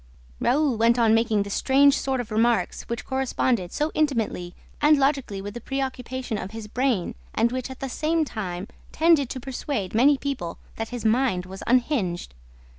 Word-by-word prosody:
Raoul 280 -3 +2
went 230 +2 +4
on 225 -2 +4
making 225 -2 +2
this 200 0 -5
strange 280 +1 +4
sort 265 -2 -1
of 235 -2 -5
remarks 230 +2 +1
which 235 -1 -4
corresponded 255 -7 0
so 300 +2 -1
intimately 230 - -1 0.3
and 300 0 +6
logically 270 -8 0
with 205 0 -6
the 240 - -7
preoccupation 260 -3 -3
of 185 - -5
his 220 0 -7
brain 245 -4 0 0.2
and 235 - +2
which, 255 0 -3
at 260 - -10
the 270 - -2
same 315 +4 0
time, 190 -6 -5 0.2
tended 315 -5 +3
to 260 - -4
persuade 255 -5 -4
many 270 +6 +5
people 265 -13 -4 0.2
that 225 0 -3
his 245 -2 -6
mind 220 -5 +2
was 190 +1 -9
unhinged. 235 - +1
245 Hz, 175 wpm, -25 LUFS, 215-270 Hz, 0.3 s, and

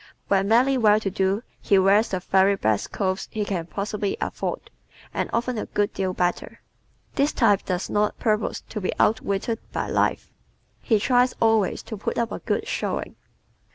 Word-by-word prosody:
When 195 0 +2
merely 255 +4 +4
well 215 -2 +5
to 195 -3 -3
do 195 +3 0 0.2
he 200 - +3
wears 195 +4 +4
the 185 - -1
very 195 +2 +3
best 110 - 0
clothes 190 -2 -2
he 215 -1 -3
can 175 -5 -3
possibly 200 +1 -3
afford, - - -4 0.4
and - - -2
often 235 0 -1
a - - -4
good 205 0 -1
deal 190 -1 -1
better. 180 -1 -2 0.5
This 285 +2 +2
type 205 -6 +3
does 180 0 -2
not 210 0 0
purpose 215 -2 0
to 210 - -5
be 185 - -1
outwitted 220 +1 +1
by - - -3
life. - - 0 0.5
He 220 -3 +2
tries 250 +2 +3
always 225 -3 +2
to 220 - -7
put - - -3
up 235 -1 0
a - - -4
good - - -2
showing. - - -3
205 Hz, 175 wpm, -24 LUFS, 195-225 Hz, 0.5 s, well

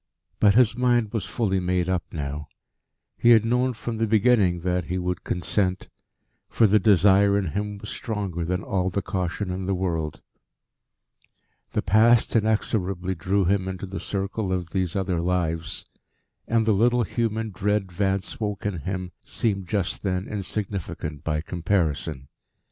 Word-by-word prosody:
But 100 -1 +5
his 120 -2 +5
mind 120 -3 +2
was 110 - -1
fully 100 -5 0
made 90 -1 0
up 95 -1 0
now. 75 -1 -4 0.7
He 120 - +4
had 115 -2 +7
known 125 +2 +1
from 115 0 -5
the 115 0 +1
beginning 105 -5 +3
that 90 -1 0
he 90 - -2
would 90 -1 -2
consent, 95 +1 -1 0.6
for 115 - +3
the 105 +1 +5
desire 100 0 +5
in 95 -5 -1
him 105 +2 -3
was 105 +1 -8
stronger 100 -7 -3
than 90 +2 -2
all 95 -2 0
the 100 +1 -2
caution 90 +1 -2
in 95 +1 -3
the 95 0 0
world. 80 -4 -2 1.5
The - - 0
Past 110 +5 +4
inexorably 100 -4 0
drew 95 +3 0
him 95 +1 +1
into 95 0 -4
the 95 +1 -6
circle 100 0 -3
of 90 -2 -2
these 95 -3 -1
other 95 -3 0
lives, 85 -2 -1 0.6
and 115 -1 +2
the 110 - +4
little 120 +4 +3
human 110 0 -2
dread 100 0 -1
Vance 95 +2 -1
woke 105 -3 -3
in 100 -5 -1
him 90 +3 -4
seemed 100 -5 -2
just 100 -2 -1
then 95 -1 -2
insignificant 95 -7 -4
by 75 -2 -1
comparison. 80 -6 -1
95 Hz, 155 wpm, -25 LUFS, 90-105 Hz, 1.5 s, had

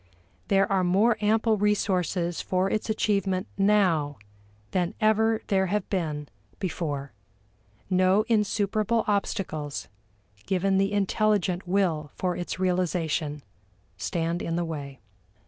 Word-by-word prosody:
There 195 -1 +4
are 190 -1 +3
more 200 +6 +3
ample 220 +1 +2
resources 185 -4 0
for 185 +1 0
its 215 - -1
achievement 195 -3 0
now 185 -8 +2 0.5
than 180 +1 0
ever 220 0 +2
there 190 -1 +1
have 210 +3 -1
been 155 -6 -2 0.3
before. 150 -6 -3 0.8
No 185 +2 +3
insuperable 215 0 +1
obstacles, 170 -7 -2 0.6
given 195 +1 +2
the 195 +1 +1
intelligent 200 -2 +1
will 175 -6 +1
for 180 -1 -1
its 175 - -4
realization, 170 -5 -1 0.5
stand 165 - -2
in 165 - -2
the 175 0 0
way. 140 -4 -6
185 Hz, 110 wpm, -26 LUFS, 170-205 Hz, 0.8 s, There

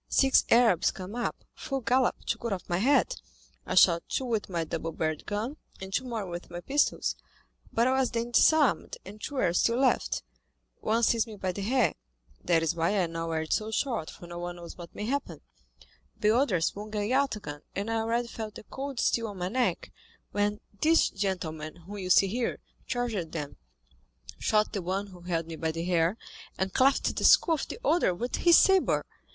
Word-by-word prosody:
Six 270 -1 +4
Arabs 230 -8 +5
came 190 +1 -7
up, 240 0 -3
full 270 -3 -4
gallop, 255 +1 +2
to - - -1
cut 235 -3 -2
off 185 - -6
my 175 0 0
head. 285 - +3 0.5
I - - -2
shot 170 -2 +6
two 265 - -1
with 225 -5 -2
my 170 -3 -1
double 165 +1 -4
barrelled 155 -1 -3
gun, 220 +8 -3 0.2
and 190 0 -8
two 260 - 0
more 230 -5 -3
with 175 -1 -7
my 175 0 -6
pistols, 280 +11 +1 0.6
but 230 - +2
I - - +3
was 265 -1 +2
then 235 0 -3
disarmed, 275 - +3
and 205 +3 -11
two 290 - -5
were 175 -10 +1
still 230 +6 +2
left; 260 0 +1 0.6
one 225 +2 0
seized 230 0 +3
me 220 - -8
by 190 -2 -2
the 200 - -6
hair 245 +4 +2 0.5
(that 165 -2 +2
is 165 - +1
why 170 +5 0
I 185 - +3
now 165 0 -4
wear 160 -1 -1
it 160 - -2
so 215 0 -1
short, 220 - -1
for - - -11
no 175 0 -7
one 175 0 -5
knows 170 -1 -10
what 170 -2 -11
may 210 - -4
happen), 235 - -3 0.8
the 215 +1 +3
other 235 - +2
swung 210 +5 -3
a 205 0 0
yataghan, 215 - -1
and 205 +3 -2
I 225 - +1
already 230 +2 0
felt 220 -2 -7
the - - -9
cold 270 +2 -6
steel 230 -1 +1
on 205 -2 -8
my 180 0 -2
neck, 250 +3 -1 0.4
when 205 +1 0 0.2
this 325 +1 +4
gentleman 160 -6 -3
whom 190 +4 -9
you 185 -1 -4
see 190 - +6
here 230 +5 -2 0.3
charged 235 -10 -2
them, 150 -3 -5 0.8
shot 215 0 +1
the 200 - -2
one 190 +3 -2
who 185 -3 -14
held 170 -2 -2
me 165 -1 -7
by 160 0 -1
the 165 +1 -4
hair, 175 +2 +2 0.4
and 190 0 -2
cleft 270 +1 +3
the - - -3
skull 440 -9 +6
of 310 - -2
the - - -6
other 295 - +3
with 245 +7 -3
his 340 -2 +6
sabre. 385 -1 +4
205 Hz, 205 wpm, -28 LUFS, 175-245 Hz, 0.8 s, shot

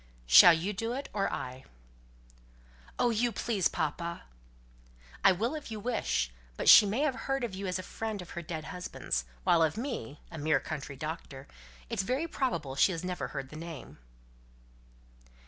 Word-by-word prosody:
Shall 65 - +9
you 180 +6 -2
do 225 +4 -3
it, 275 +2 -5
or 200 -2 0
I?" 130 +1 -5 1.3
"Oh, 245 - +3
you, 235 +2 +1
please, 210 -3 0
papa!" 170 +2 -3 1.0
"I 195 - +8
will, 220 - -1
if 305 -5 -6
you 220 -1 -5
wish. 200 - -1 0.3
But - - -3
she 210 - +10
may 220 +7 0
have 300 -3 +2
heard 270 0 -2
of 230 -5 -3
you 195 +1 -4
as 185 - -1
a 185 - -6
friend 220 +1 -4
of 180 -2 -9
her 175 - -5
dead 160 -1 -5
husband's; 180 - -3 0.2
while 170 - +4
of 160 +3 +2
me 230 - -5
a 165 - -7
mere 150 -1 +2
country 140 0 -6
doctor 145 -2 -6 0.4
it's - - -1
very 255 +11 -1
probable 170 - -2
she 165 - +4
has 165 0 -5
never 180 -1 -3
heard 135 - -6
the 155 - -11
name." 155 - -9
180 Hz, 175 wpm, -30 LUFS, 155-225 Hz, 1.3 s, she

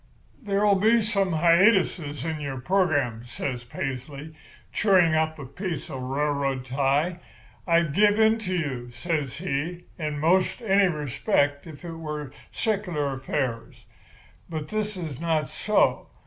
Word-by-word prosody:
"'There'll 205 -2 +2
be 225 +4 +5
some 200 -4 0
hiatuses 170 - +3
in 160 -1 -2
your 135 -3 -4
program,' 145 - +1
says 125 0 -4
Paisley, 135 +5 -6 0.4
chewing 185 -6 +4
up 155 0 +1
a 140 - -7
piece 165 +2 -5
of 135 - -4
a - - -6
railroad 135 0 -1
tie. 140 +6 0 0.5
'I'd 170 -3 +3
give 205 +4 +4
in 220 +1 +4
to 185 -4 -2
you,' 130 -8 -3
says 140 +1 -3
he, 170 +1 -3 0.2
'in 150 -2 -2
'most 180 - +2
any 200 -2 +4
respect 145 - 0
if 160 +2 -11
it 170 - -5
was 150 -3 -5 0.2
secular 180 -10 -1
affairs, 130 -3 -3 0.6
but 155 -2 -5
this 215 -2 -2
is 155 -7 -5
not 160 -2 +1
so. 210 - +1
155 Hz, 140 wpm, -26 LUFS, 140-185 Hz, 0.6 s, be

